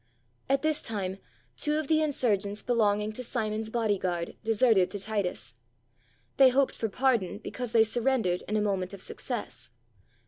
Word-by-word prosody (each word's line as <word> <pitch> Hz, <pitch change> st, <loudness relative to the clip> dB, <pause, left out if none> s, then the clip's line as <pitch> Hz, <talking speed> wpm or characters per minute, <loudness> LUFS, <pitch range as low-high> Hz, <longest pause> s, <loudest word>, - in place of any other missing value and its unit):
At 275 Hz, +1 st, +2 dB
this 310 Hz, -1 st, +1 dB
time 195 Hz, -3 st, -4 dB, 0.4 s
two 300 Hz, 0 st, +1 dB
of 310 Hz, -2 st, -2 dB
the 315 Hz, +1 st, +3 dB
insurgents 215 Hz, -9 st, 0 dB
belonging 210 Hz, -3 st, +1 dB
to 250 Hz, +4 st, -6 dB
Simon's 220 Hz, -2 st, -2 dB
body 220 Hz, -4 st, 0 dB
guard 175 Hz, -2 st, -3 dB
deserted 220 Hz, -4 st, +3 dB
to 205 Hz, -, -5 dB
Titus. 200 Hz, -, -3 dB, 0.8 s
They 265 Hz, -1 st, +8 dB
hoped 265 Hz, +1 st, +2 dB
for 225 Hz, -, -3 dB
pardon 235 Hz, -5 st, +1 dB
because 245 Hz, +2 st, -5 dB
they 225 Hz, -1 st, +6 dB
surrendered 225 Hz, -5 st, +1 dB
in 215 Hz, -, 0 dB
a -, -, +1 dB
moment 195 Hz, -2 st, -1 dB
of 190 Hz, -, -11 dB
success. 205 Hz, -, -5 dB
220 Hz, 160 wpm, -28 LUFS, 200-250 Hz, 0.8 s, They